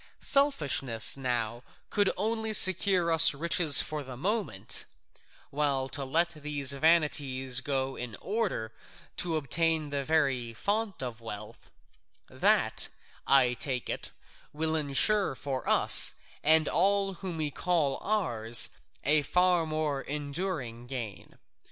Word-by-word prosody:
Selfishness 140 Hz, -, +2 dB
now 120 Hz, -3 st, -4 dB, 0.3 s
could 205 Hz, -1 st, +1 dB
only 220 Hz, +2 st, -3 dB
secure 190 Hz, -3 st, +5 dB
us 165 Hz, -1 st, +7 dB
riches 165 Hz, 0 st, +5 dB
for 155 Hz, -1 st, -6 dB
the 130 Hz, -3 st, -11 dB
moment, 180 Hz, -, -1 dB, 0.7 s
while 140 Hz, -2 st, -2 dB
to 140 Hz, -, -2 dB
let 165 Hz, +6 st, +1 dB
these 145 Hz, -3 st, 0 dB
vanities 140 Hz, -4 st, +2 dB
go 135 Hz, -2 st, -3 dB
in 120 Hz, -3 st, -6 dB
order 195 Hz, -, -4 dB, 0.4 s
to 170 Hz, -2 st, -1 dB
obtain 155 Hz, +1 st, -1 dB
the 140 Hz, -1 st, -3 dB
very 135 Hz, -6 st, -2 dB
fount 205 Hz, -, -3 dB
of 120 Hz, -2 st, -8 dB
wealth, 105 Hz, -2 st, -10 dB, 0.6 s
that, -, -, 0 dB, 0.4 s
I 130 Hz, -3 st, +4 dB
take 125 Hz, 0 st, -3 dB
it, -, -, -5 dB, 0.4 s
will 160 Hz, +1 st, -3 dB
ensure 155 Hz, +5 st, +1 dB
for 135 Hz, -1 st, -6 dB
us -, -, +4 dB, 0.3 s
and 155 Hz, +1 st, +5 dB
all 195 Hz, +1 st, 0 dB
whom 185 Hz, -2 st, -8 dB
we 155 Hz, -2 st, -4 dB
call 160 Hz, -4 st, -2 dB
ours 120 Hz, -, +2 dB, 0.3 s
a 150 Hz, +2 st, +3 dB
far 180 Hz, +2 st, 0 dB
more 155 Hz, -3 st, -3 dB
enduring 145 Hz, -5 st, -6 dB
gain. 120 Hz, -6 st, -9 dB
150 Hz, 120 wpm, -27 LUFS, 130-175 Hz, 0.7 s, us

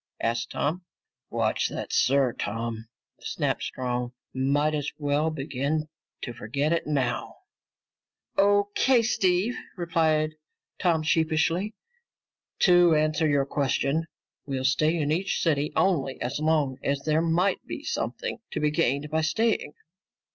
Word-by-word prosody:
asked 115 Hz, +1 st, -1 dB
Tom. 170 Hz, +5 st, -2 dB, 0.5 s
"Watch -, -, 0 dB
that -, -, -5 dB
'sir,' 135 Hz, -2 st, +3 dB
Tom," 115 Hz, +1 st, -4 dB, 0.3 s
snapped -, -, -2 dB
Strong. 125 Hz, -1 st, -3 dB, 0.2 s
"Might 140 Hz, +3 st, +1 dB
as 150 Hz, -1 st, -1 dB
well 145 Hz, +1 st, +1 dB
begin 150 Hz, +1 st, -2 dB, 0.3 s
to 120 Hz, -, -4 dB
forget 140 Hz, +7 st, -1 dB
it 170 Hz, -, -1 dB
now." 130 Hz, -5 st, -1 dB, 1.0 s
"O.K., 205 Hz, +5 st, +3 dB
Steve," 200 Hz, -1 st, +2 dB, 0.2 s
replied 160 Hz, -3 st, +1 dB, 0.5 s
Tom 165 Hz, -4 st, +2 dB
sheepishly. 160 Hz, +6 st, +1 dB, 0.9 s
"To 175 Hz, -3 st, +6 dB
answer 155 Hz, +1 st, +2 dB
your 140 Hz, -1 st, +2 dB
question, 140 Hz, +3 st, 0 dB, 0.4 s
we'll 130 Hz, -2 st, -2 dB
stay 155 Hz, +5 st, +3 dB
in 150 Hz, -2 st, 0 dB
each 185 Hz, +5 st, 0 dB
city 150 Hz, -3 st, +1 dB
only 140 Hz, -8 st, +1 dB
as 125 Hz, +4 st, -3 dB
long 150 Hz, -4 st, +1 dB
as 140 Hz, 0 st, -1 dB
there 155 Hz, +1 st, +2 dB
might 170 Hz, +4 st, +1 dB
be -, -, -6 dB
something 475 Hz, -, -3 dB
to -, -, -3 dB
be 150 Hz, 0 st, +1 dB
gained 150 Hz, -1 st, 0 dB
by 160 Hz, 0 st, +1 dB
staying. 215 Hz, -1 st, 0 dB
155 Hz, 125 wpm, -26 LUFS, 140-170 Hz, 1.0 s, To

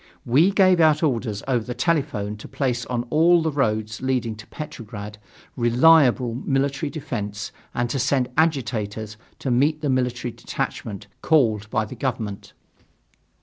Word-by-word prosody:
We 145 Hz, +10 st, +4 dB
gave 185 Hz, -3 st, +4 dB
out 155 Hz, -1 st, +4 dB
orders 115 Hz, -8 st, -1 dB
over 125 Hz, -4 st, +1 dB
the 125 Hz, +1 st, -6 dB
telephone 125 Hz, -7 st, 0 dB
to 105 Hz, -, -10 dB
place 130 Hz, -3 st, -2 dB
on 120 Hz, -1 st, -1 dB
all 165 Hz, +2 st, +5 dB
the 160 Hz, -, 0 dB
roads 110 Hz, -6 st, -1 dB
leading 125 Hz, -4 st, -1 dB
to 110 Hz, -, -12 dB
Petrograd 105 Hz, -7 st, -8 dB, 0.4 s
reliable 125 Hz, 0 st, +4 dB
military 140 Hz, +4 st, -1 dB
defence 105 Hz, -9 st, -5 dB, 0.2 s
and 120 Hz, 0 st, 0 dB
to 135 Hz, -, -1 dB
send 135 Hz, -1 st, +1 dB
agitators 115 Hz, -9 st, -1 dB, 0.2 s
to 135 Hz, -, -3 dB
meet 145 Hz, +5 st, +2 dB
the 145 Hz, -3 st, 0 dB
military 125 Hz, -1 st, -1 dB
detachment 105 Hz, -2 st, -5 dB, 0.2 s
called 110 Hz, -9 st, +2 dB
by 110 Hz, -2 st, 0 dB
the -, -, -9 dB
government. 110 Hz, -6 st, -4 dB
125 Hz, 145 wpm, -23 LUFS, 110-145 Hz, 0.4 s, all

